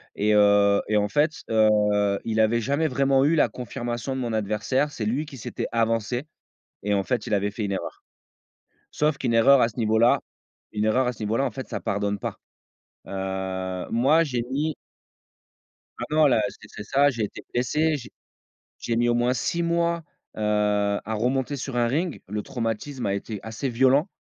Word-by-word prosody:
et 105 +1 +2
heu 100 -1 +5
et 110 - 0
en 105 0 +1
fait, 150 +5 +2 0.2
heu, 105 -2 +3
il 110 -1 -1
avait 115 +2 +3
jamais 140 +7 +1
vraiment 135 0 +2
eu 155 - +3
la 160 - +3
confirmation 120 0 -4
de 130 - -3
mon 120 -2 -2
adversaire, 110 +7 0
c'est 115 -7 -4
lui 130 +8 -1
qui 140 -3 -11
s'était - - -4
avancé 115 +3 0 0.6
et 105 +1 -1
en 100 - +2
fait 120 +1 -2
il - - -4
avait 100 0 +1
fait 105 +1 -4
une 100 - -2
erreur. 95 - -5 0.9
Sauf 150 0 +1
qu'une 125 -3 -1
erreur 125 +4 +6
à 115 - +4
ce 110 - -14
niveau-là, 110 +1 +3 0.5
une 105 0 -1
erreur 125 +4 +2
à 125 - 0
ce 110 - -10
niveau-là 110 +6 0
en - - -2
fait 130 - -7
ça - - -3
pardonne 100 0 -1
pas. - - -5 0.7
Heu, 95 -1 -4
moi 140 +8 +4
j'ai 125 -6 -2
mis 150 +2 -1 1.2
Maintenant 155 0 +3
là 120 -5 +3
c'est - - -14
c'est - - -8
ça, 140 +7 +3
j'ai 115 -5 -2
été 105 - -6
blessé, 150 +6 +1
j'ai 125 - -8 0.7
j'ai 115 - -2
mis 120 +1 +2
au 120 - +3
moins 120 +2 +2
6 170 +7 -1
mois, 170 0 0 0.3
heu, - - -6 0.6
à 110 - -3
remonter 130 +5 0
sur 135 -1 -5
un 120 - +3
ring, 155 +7 -1
le 105 +1 -3
traumatisme 120 +3 -4
a 100 - 0
été 100 +1 -5
assez 110 +4 -4
violent 130 - +3
120 Hz, 190 wpm, -25 LUFS, 105-135 Hz, 1.2 s, erreur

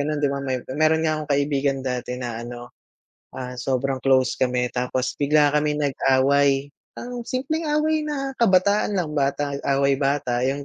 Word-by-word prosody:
gano'n, 150 +1 -1
'di 145 -1 +1
ba. 140 - -3
May 130 -2 -2
mayro'n 155 +4 +1
nga 155 - +2
akong 150 -1 -8
kaibigan 140 -1 0
dati 125 -1 -3
na 120 -2 -5
ano, 120 +1 -9 0.6
ah, 125 -1 -6
sobrang 130 +2 -1
close 130 -2 +3
kami. 125 -1 +1
Tapos 125 0 -1
bigla 145 0 +3
kami 150 0 +1
nag-away, 140 0 +2 0.3
um, 245 0 -6
simpleng 310 +6 -2
away 305 +1 +1
na 275 -2 -3
kabataan 205 -1 +3
lang, 165 -4 -1
bata 140 0 0
away-bata 140 -2 +1
'yong 140 +2 -1
140 Hz, 160 wpm, -23 LUFS, 130-155 Hz, 0.6 s, close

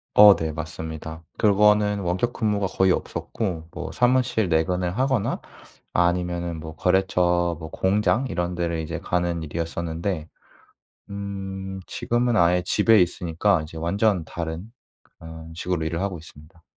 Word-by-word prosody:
어 105 -1 +10
네. 80 -1 -2
맞습니다. 80 0 -6 0.2
그거는 105 0 +4
원격 95 +6 -1
근무가 105 -3 0
거의 95 0 +2
없었고 90 -3 -3
뭐 90 +1 -6
사무실 120 -4 +2
내근을 90 +2 0
하거나 130 -5 +1 0.5
아니면은 85 -1 0
뭐 80 0 -8
거래처 90 -2 +2
뭐 80 0 -8
공장 105 +6 +1
이런 90 +1 -2
데를 85 -1 -1
이제 80 - -4
가는 85 -1 -1
일이었었는데 80 +1 -3 0.8
음 95 -1 -5
지금은 120 0 0
아예 90 0 +4
집에 110 0 +5
있으니까 90 0 +1
이제 80 +1 -9
완전 90 +2 +1
다른 85 +5 -5 0.5
그런 80 0 -10
식으로 85 -1 -2
일을 85 +3 -2
하고 95 -4 -2
있습니다. 80 +1 -16
90 Hz, 305 characters per minute, -24 LUFS, 80-100 Hz, 0.8 s, 어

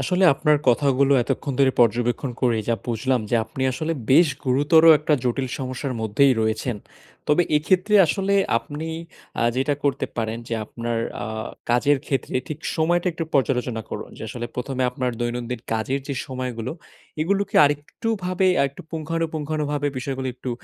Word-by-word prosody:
আসলে 185 +1 +1
আপনার 150 +1 +3
কথাগুলো 140 +2 +3
এতক্ষন 140 +4 -2
ধরে 135 -1 +4
পর্যবেক্ষন 120 +3 +2
করে 120 -3 +3
যা 115 - +3
বুঝলাম। 125 +2 0
যে, 120 - +3
আপনি 135 +1 -6
আসলে 155 +5 -2 0.2
বেশ 165 +3 +6 0.2
গুরুতর 145 +5 +4 0.2
একটা 150 0 +2
জটিল 130 +2 0
সমস্যার 130 0 -4
মধ্যেই 110 +6 +3
রয়েছেন। 110 +2 -1 0.5
তবে 150 +4 +4
এক্ষেত্রে 185 +7 +2
আসলে 195 +4 0 0.2
আপনি 150 +6 -7 0.5
আ - - +2
যেটা 140 +2 +1
করতে 140 -2 +1
পারেন। 115 -1 -2
যে, 115 - -1
আপনার 115 +1 -3 0.3
আ - - -5 0.4
কাজের 140 +4 +3
ক্ষেত্রে 135 - -2
ঠিক 155 - -5 0.2
সময়টা 175 +3 +1
একটু 165 0 -3
পর্যালোচনা 125 -4 +1
করুন। - - -5
যে, - - -9
আসলে 120 +2 -5
১ম 125 +2 -4
এ - - +2
আপনার 125 0 -2
দৈনন্দিন 120 0 -3
কাজের 115 +5 -1
যে, 140 - -2
সময়গুলো 125 -2 -4 0.5
এগুলোকে 200 +4 -1
আরেকটু 145 +9 -2 0.2
ভাবে 185 +1 +1
আরেকটু 140 +5 -1
পুঙ্খানুপুঙ্খানুভাবে 155 -2 -2
বিষয়গুলো 130 0 -3
একটু 130 0 -6
135 Hz, 155 wpm, -23 LUFS, 125-155 Hz, 0.5 s, বেশ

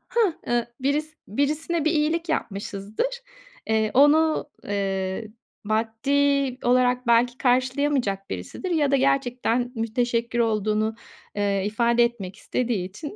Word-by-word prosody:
hah, 435 -8 +3
ııı, 240 -1 +1
biris 300 +4 -1
birisine 300 +7 -1
bir 315 - +3
iyilik 325 +2 0
yapmışızdır. 215 - -3 0.5
Eee, 220 -1 +1
onu, 295 +2 +4
eee, 195 +1 -2 0.4
maddi 255 +5 +1
olarak 250 0 +2
belki 240 +1 +3
karşılayamayacak 255 -5 +1
birisidir 95 - -5
ya 295 -4 +2
da - - +5
gerçekten 250 -2 +1
müteşekkir 235 +1 -1
olduğunu, 215 -1 +1 0.4
eee, 200 -1 0
ifade 235 +3 +2
etmek 200 -6 -3
istediği 230 -5 -2
için 290 - -8
245 Hz, 115 wpm, -24 LUFS, 215-285 Hz, 0.5 s, da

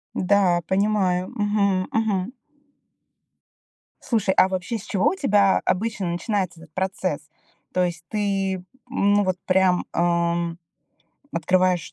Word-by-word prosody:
Да, 185 -2 +3
понимаю. 190 -2 +1
Мгм, 200 -3 +1
мгм. 220 -1 0 1.7
Слушай, 215 -5 +1
а - - +6
вообще 190 +5 -3
с 205 - -10
чего 195 +7 +1
у 375 - -3
тебя 205 - +3
обычно 205 -1 -1
начинается 175 0 -2
этот 160 -2 -16
процесс? 185 -5 -2 0.5
То 180 - +2
есть 170 -2 -3
ты, 195 -3 -1 0.3
ну, 205 -5 +2
вот 185 -1 -1
прям, 185 -1 +3
ам, 170 0 0 0.8
открываешь, 180 0 +1
190 Hz, 115 wpm, -23 LUFS, 180-205 Hz, 1.7 s, а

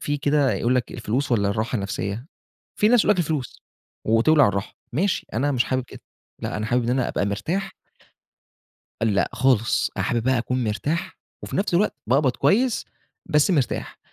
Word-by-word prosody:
في 145 - -1
كده 145 -1 +2
يقول 120 +2 +1
لك 125 -1 -1
الفلوس 125 +4 -2
والّا 100 -4 +2
الراحة 110 +4 -1
النفسية، 100 +3 -4 0.5
في 210 - +4
ناس 245 0 +5
يقول - - +3
لك 195 - -4
الفلوس 155 -6 -2 0.4
وتولَع 125 +5 +5
الراحة، 100 0 -3 0.2
ماشي 185 +8 0
أنا 140 +6 +1
مش 125 -3 +2
حابب 130 -1 -1
كده - - -12 0.4
لأ - - -3
أنا 110 - -3
حابب 120 +2 +1
إن 120 - 0
أنا 125 -1 +1
أبقى 100 - -1
مرتاح 165 - -2 1.3
أ - - +2
لأ 100 -3 +1
خالص 125 -2 +2
أنا - - 0
حابب 120 -2 0
بقى 130 +1 +2
اكون 125 +2 -1
مرتاح 145 - -2 0.3
وفي - - -5
نفس 195 -2 0
الوقت 200 +5 +2
باقبض 135 +1 +3
كويس 240 +4 +2 0.4
بس 150 +5 +3
مرتاح، 140 -8 -1
130 Hz, 180 wpm, -23 LUFS, 115-150 Hz, 1.3 s, ناس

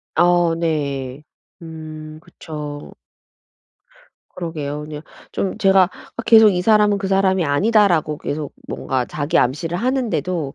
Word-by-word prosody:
아 175 -1 +3
네. 140 -4 -2 0.4
음 155 -1 -9
그쵸. 150 -3 -8 1.4
그러게요. 150 -4 -5
그냥 150 0 -8 0.3
좀 195 - -2
제가 195 -3 +4 0.3
아 230 - -4
계속 220 -1 +8
'이 180 -2 -1
사람은 210 0 +4
그 195 - -3
사람이 190 -2 +2
아니다.'라고 165 -1 +2
계속 145 -1 -4
뭔가 130 -2 -2
자기 145 0 -1
암시를 155 +7 0
하는데도 210 - -1
165 Hz, 245 characters per minute, -20 LUFS, 150-195 Hz, 1.4 s, 계속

